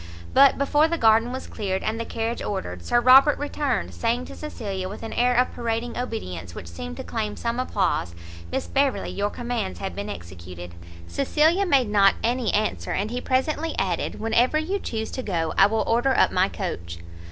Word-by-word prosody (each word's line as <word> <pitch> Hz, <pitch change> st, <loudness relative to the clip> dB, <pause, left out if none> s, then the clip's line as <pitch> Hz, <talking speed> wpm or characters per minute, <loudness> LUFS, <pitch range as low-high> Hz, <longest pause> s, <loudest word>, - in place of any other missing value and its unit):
But 275 Hz, 0 st, +6 dB
before 295 Hz, +2 st, +3 dB
the 335 Hz, +1 st, -1 dB
garden 225 Hz, -1 st, +4 dB
was 260 Hz, +1 st, -5 dB
cleared, 190 Hz, -3 st, -3 dB
and 220 Hz, +1 st, -2 dB
the 230 Hz, -, -3 dB
carriage 230 Hz, +1 st, -3 dB
ordered, 90 Hz, -, -4 dB
Sir 240 Hz, -, +2 dB
Robert 265 Hz, +4 st, +7 dB
returned; 290 Hz, -3 st, -2 dB
saying 240 Hz, +2 st, -1 dB
to -, -, -10 dB
Cecilia, 195 Hz, -11 st, -5 dB
with 210 Hz, -, -8 dB
an 225 Hz, -, -5 dB
air 245 Hz, +1 st, +2 dB
of 250 Hz, +1 st, +3 dB
parading 235 Hz, +1 st, -3 dB
obedience 90 Hz, -, -5 dB
which -, -, -7 dB
seemed 80 Hz, -1 st, -7 dB
to -, -, -5 dB
claim 215 Hz, -2 st, -3 dB
some 235 Hz, +1 st, -2 dB
applause, 185 Hz, -, -1 dB, 0.4 s
"Miss -, -, -2 dB
Beverley, 275 Hz, -1 st, 0 dB
your 205 Hz, +1 st, -1 dB
commands 235 Hz, -4 st, -3 dB
have 195 Hz, -, -5 dB
been 205 Hz, +1 st, -5 dB
executed." 90 Hz, -, -9 dB, 0.3 s
Cecilia 315 Hz, +7 st, +2 dB
made 265 Hz, -8 st, +3 dB
not 200 Hz, -2 st, +5 dB
any 240 Hz, -1 st, +1 dB
answer, 215 Hz, +1 st, -1 dB
and 210 Hz, +3 st, -2 dB
he 250 Hz, +1 st, -3 dB
presently 300 Hz, +5 st, 0 dB
added, 185 Hz, -3 st, -1 dB
"Whenever 230 Hz, +6 st, +2 dB
you 365 Hz, +6 st, -1 dB
chuse 220 Hz, -, -4 dB
to 260 Hz, -, -4 dB
go 165 Hz, -8 st, -2 dB
I 195 Hz, -, +6 dB
will 220 Hz, +1 st, 0 dB
order 240 Hz, +4 st, +2 dB
up -, -, +4 dB
my 185 Hz, +2 st, +2 dB
coach." 85 Hz, -, -5 dB
225 Hz, 190 wpm, -24 LUFS, 195-255 Hz, 0.4 s, Robert